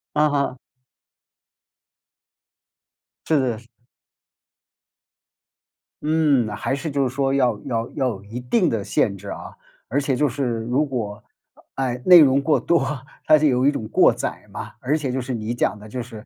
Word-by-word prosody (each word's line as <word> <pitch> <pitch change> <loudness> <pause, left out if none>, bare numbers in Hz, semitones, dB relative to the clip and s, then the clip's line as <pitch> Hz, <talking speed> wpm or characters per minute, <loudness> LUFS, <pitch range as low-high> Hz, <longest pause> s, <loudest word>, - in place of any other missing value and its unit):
嗯 150 0 +4
哼。 140 -2 -1 2.7
是 155 -2 +3
的， 125 -4 -1
是。 115 +1 -16 2.3
嗯， 150 -6 +2
还 135 - -2
是 145 +3 -4
就 140 -1 +1
是 125 - -8
说 135 -1 +1
要 125 -5 +2
要 115 -1 -2
要 130 - -1
有 100 -4 -7
一 110 +4 -7
定 160 - +1
的 110 -3 -2
限 100 0 0
制 100 +1 -10
啊。 - - -8 0.3
而 140 +5 0
且 135 -1 0
就 145 +3 +2
是 140 +2 -3 0.2
如 125 +6 +1
果， 110 -7 -5 0.5
啊， 135 - -1
哎， 125 -1 -3
内 180 -1 +9
容 140 -2 +5
过 150 +2 +2
多， 170 0 +2 0.4
它 155 - +6
是 155 - +1
有 130 -1 +2
一 - - +5
种 110 -7 -5
过 - - +5
载 - - -5
嘛， - - -7
而 145 +5 0
且 140 -4 -3
就 130 +1 -2
是 125 +1 -4
你 110 +1 -3
讲 120 - 0
的 105 - -12
就 125 +3 -5
是， 115 -2 -10
130 Hz, 185 characters per minute, -22 LUFS, 115-145 Hz, 2.7 s, 内